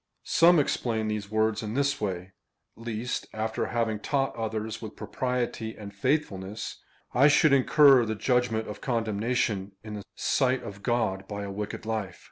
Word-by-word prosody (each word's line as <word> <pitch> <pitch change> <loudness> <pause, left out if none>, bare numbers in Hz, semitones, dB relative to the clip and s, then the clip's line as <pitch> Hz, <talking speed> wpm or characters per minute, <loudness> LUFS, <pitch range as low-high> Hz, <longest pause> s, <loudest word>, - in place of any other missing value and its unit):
Some 175 +1 +5
explain 115 -6 0
these 105 -2 -3
words 110 0 +1
in 110 0 -4
this 140 -1 +1
way 95 -2 -3 0.2
— - - -54
" - - -52
Lest, 115 +1 -4
after 110 +1 -2
having 115 -2 -1
taught 135 +4 0
others 110 -1 -3
with 110 -2 -7
propriety 125 -3 -3
and 100 -1 -9
faithfulness, 105 -4 -2 0.3
I 135 +4 +6
should 150 0 +5
incur 140 -1 +6
the 110 0 -2
judgment 120 -1 +1
of 105 - -7
condemnation 110 -3 -1
in 110 -1 -7
the 105 -1 -6
sight 130 -1 +1
of 100 0 -8
God 100 -6 0
by 100 -1 -5
a 100 - -5
wicked 105 +2 -5
life." 110 -5 -3
110 Hz, 165 wpm, -28 LUFS, 105-125 Hz, 0.3 s, I